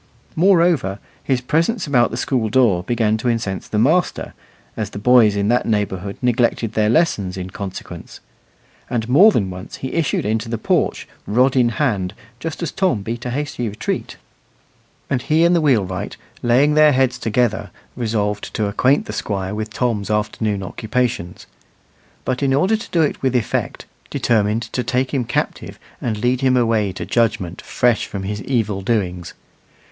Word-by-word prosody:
Moreover, 170 Hz, -, +3 dB, 0.3 s
his 130 Hz, -2 st, 0 dB
presence 170 Hz, -, 0 dB
about 125 Hz, -5 st, +3 dB
the 115 Hz, -, -5 dB
school 125 Hz, -3 st, 0 dB
door 110 Hz, -7 st, +3 dB
began 110 Hz, +1 st, 0 dB
to 115 Hz, -, -3 dB
incense 110 Hz, -5 st, -2 dB
the 105 Hz, -, -2 dB
master, 155 Hz, +11 st, +1 dB, 0.4 s
as 110 Hz, -2 st, -3 dB
the 100 Hz, -, -9 dB
boys 110 Hz, -1 st, +5 dB
in 100 Hz, 0 st, 0 dB
that 120 Hz, +1 st, +2 dB
neighbourhood 100 Hz, -3 st, -2 dB
neglected 120 Hz, -2 st, +1 dB
their 105 Hz, -1 st, +2 dB
lessons 105 Hz, -, +1 dB
in 95 Hz, 0 st, -6 dB
consequence; 95 Hz, -1 st, -8 dB, 0.7 s
and 115 Hz, -2 st, -2 dB
more 180 Hz, -, +7 dB
than 95 Hz, -, 0 dB
once 90 Hz, 0 st, -8 dB
he 130 Hz, -, -6 dB
issued 165 Hz, -10 st, 0 dB
into 110 Hz, +1 st, -1 dB
the 115 Hz, -, -2 dB
porch, -, -, 0 dB, 0.2 s
rod 125 Hz, +5 st, +3 dB
in 125 Hz, -2 st, +4 dB
hand, 105 Hz, -7 st, -1 dB, 0.2 s
just 165 Hz, +1 st, -5 dB
as 165 Hz, -, -2 dB
Tom 130 Hz, -, 0 dB
beat 120 Hz, +3 st, -4 dB
a -, -, -2 dB
hasty 130 Hz, -3 st, -3 dB
retreat. 105 Hz, +2 st, -4 dB, 0.9 s
And 130 Hz, -3 st, -1 dB
he 160 Hz, +4 st, +3 dB
and 175 Hz, +1 st, +4 dB
the 170 Hz, -, +3 dB
wheelwright, 100 Hz, -, 0 dB, 0.2 s
laying 130 Hz, +5 st, +3 dB
their 150 Hz, -1 st, +6 dB
heads 130 Hz, -1 st, +1 dB
together, 115 Hz, 0 st, 0 dB, 0.3 s
resolved 105 Hz, -4 st, -2 dB
to 110 Hz, -, 0 dB
acquaint 125 Hz, +7 st, +2 dB
the -, -, -6 dB
Squire 95 Hz, -1 st, -3 dB
with 110 Hz, +1 st, -4 dB
Tom's 110 Hz, -5 st, -1 dB
afternoon 105 Hz, -1 st, -1 dB
occupations; 110 Hz, -3 st, -3 dB, 0.8 s
but 130 Hz, +1 st, -1 dB
in 135 Hz, -1 st, +2 dB
order 185 Hz, +10 st, +3 dB
to 220 Hz, -, -7 dB
do 165 Hz, -2 st, +2 dB
it 150 Hz, -, -1 dB
with 130 Hz, -1 st, 0 dB
effect, 120 Hz, -3 st, -1 dB, 0.2 s
determined 110 Hz, 0 st, +1 dB
to 125 Hz, -, -1 dB
take 130 Hz, +3 st, -1 dB
him 130 Hz, -4 st, 0 dB
captive -, -, -3 dB, 0.2 s
and 110 Hz, -3 st, -2 dB
lead 125 Hz, +3 st, 0 dB
him 130 Hz, -1 st, +3 dB
away 115 Hz, -4 st, +2 dB
to -, -, -5 dB
judgment 110 Hz, -7 st, 0 dB
fresh 120 Hz, -2 st, +1 dB
from 100 Hz, -1 st, -5 dB
his 105 Hz, +1 st, -4 dB
evil 110 Hz, -5 st, -1 dB
doings. 95 Hz, -5 st, -2 dB
115 Hz, 170 wpm, -20 LUFS, 105-130 Hz, 0.9 s, more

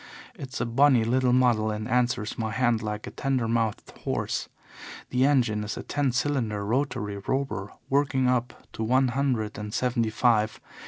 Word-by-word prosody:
It's 130 Hz, -1 st, -7 dB
a 120 Hz, -, 0 dB
bonny 125 Hz, 0 st, +4 dB
little 125 Hz, +2 st, +2 dB
model 120 Hz, -4 st, +3 dB
and 105 Hz, 0 st, -3 dB
answers 125 Hz, -3 st, 0 dB
my 110 Hz, -1 st, -2 dB
hand 120 Hz, 0 st, +1 dB
like 105 Hz, 0 st, -4 dB
a -, -, -7 dB
tender 130 Hz, -4 st, -1 dB
mouthed 115 Hz, -2 st, -1 dB
horse. -, -, -2 dB, 0.6 s
The 125 Hz, +2 st, +3 dB
engine 120 Hz, -7 st, +2 dB
is 105 Hz, -, -4 dB
a -, -, -5 dB
ten 145 Hz, -2 st, 0 dB
cylinder 120 Hz, -6 st, -1 dB
rotary 120 Hz, -4 st, -1 dB
Robur 105 Hz, -4 st, -2 dB
working 135 Hz, -2 st, +2 dB
up 125 Hz, -1 st, -1 dB
to 110 Hz, -, -3 dB
one 130 Hz, +3 st, +3 dB
hundred 120 Hz, -5 st, -1 dB
and 105 Hz, 0 st, -5 dB
seventy 120 Hz, -1 st, 0 dB
five. 110 Hz, -1 st, +2 dB
120 Hz, 165 wpm, -26 LUFS, 110-130 Hz, 0.6 s, bonny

